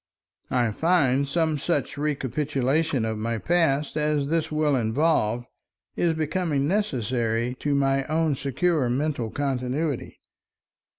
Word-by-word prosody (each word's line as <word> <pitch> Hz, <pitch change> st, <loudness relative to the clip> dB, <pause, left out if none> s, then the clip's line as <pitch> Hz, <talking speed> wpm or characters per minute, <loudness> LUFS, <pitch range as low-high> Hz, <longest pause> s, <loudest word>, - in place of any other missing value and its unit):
I 120 Hz, -3 st, +1 dB
find 140 Hz, -, +2 dB
some 160 Hz, 0 st, 0 dB
such 145 Hz, -2 st, -1 dB
recapitulation 145 Hz, -1 st, 0 dB
of 110 Hz, -1 st, -2 dB
my 115 Hz, +1 st, -1 dB
past 150 Hz, -1 st, +1 dB
as 150 Hz, -2 st, 0 dB
this 165 Hz, -1 st, 0 dB
will 155 Hz, -2 st, +2 dB
involve, 120 Hz, -1 st, +1 dB, 0.5 s
is 170 Hz, -2 st, +1 dB
becoming 155 Hz, -2 st, 0 dB
necessary 125 Hz, -, 0 dB
to 145 Hz, -1 st, 0 dB
my 135 Hz, -1 st, +2 dB
own 155 Hz, 0 st, +1 dB
secure 140 Hz, 0 st, 0 dB
mental 130 Hz, -2 st, -1 dB
continuity. 135 Hz, +2 st, -2 dB
140 Hz, 115 wpm, -25 LUFS, 125-155 Hz, 0.5 s, find